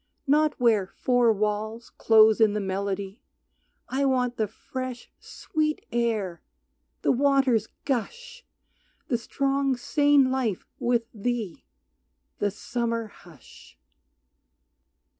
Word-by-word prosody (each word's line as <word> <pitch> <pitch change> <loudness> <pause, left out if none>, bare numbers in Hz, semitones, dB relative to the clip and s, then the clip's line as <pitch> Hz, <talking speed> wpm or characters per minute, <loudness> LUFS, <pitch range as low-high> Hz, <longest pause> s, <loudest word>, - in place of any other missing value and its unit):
Not 300 +1 +2
where 220 -6 +3
four 245 +3 +2
walls 215 +2 -2
close 220 0 +5
in 215 -2 +5
the 210 - -1
melody 195 +1 -3 0.7
I 270 +2 -1
want 250 -2 +1
the 220 -2 -1
fresh, 255 +3 -7
sweet 305 -1 -3
air, 220 -8 -1 0.6
the - - +3
water's 265 -4 +2 0.2
gush, 475 - -4 0.7
The 240 -4 +1
strong, 275 +2 0
sane 285 +1 +3
life 245 -8 -1
with 240 -1 +1
thee, 220 - -3 0.7
the 205 - +1
summer 230 +2 -3
hush. 170 -9 -17
235 Hz, 105 wpm, -26 LUFS, 215-265 Hz, 0.7 s, close